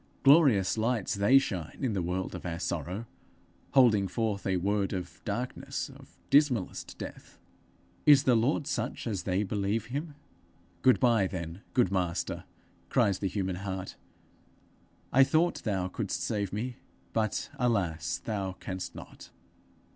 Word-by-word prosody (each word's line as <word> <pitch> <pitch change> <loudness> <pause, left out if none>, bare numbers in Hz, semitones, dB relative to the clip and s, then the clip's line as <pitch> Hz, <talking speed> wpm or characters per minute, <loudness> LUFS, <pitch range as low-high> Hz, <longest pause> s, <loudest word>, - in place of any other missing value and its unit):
Glorious 135 - +5
lights 115 -2 0
they 100 +7 +5
shine 90 - -2
in 130 -5 0
the 95 - 0
world 90 +2 -2
of - - -7
our 85 -2 -3
sorrow, 90 +5 -3 0.7
holding 110 -7 +5
forth 105 0 -2
a 95 -1 +2
word 100 +2 0
of 90 -3 -6
darkness, 125 +1 -3
of - - -17
dismallest 135 -9 +2
death! - - -9 0.7
Is 145 -2 +8
the 125 -4 +4
Lord 125 +6 +2
such 150 - -3
as 105 -6 -2
they 95 +2 0
believe 105 +2 -1
him? 150 +1 -4 0.7
'Good 130 - +5
bye, 115 -6 +4
then, 85 0 -6
good 120 -8 +3
Master!' 90 -3 -1 0.4
cries 100 -2 +2
the 100 - 0
human 95 -1 -2
heart. 95 -1 -5 1.2
'I 135 - +8
thought 160 +5 +2
thou 95 -4 0
couldst 95 - -3
save 100 -3 -1
me, 120 +4 -4 0.4
but, 110 -2 -1
alas, 85 - 0
thou 100 -4 -2
canst 95 0 -6
not. - - -11
100 Hz, 140 wpm, -29 LUFS, 95-125 Hz, 1.2 s, Is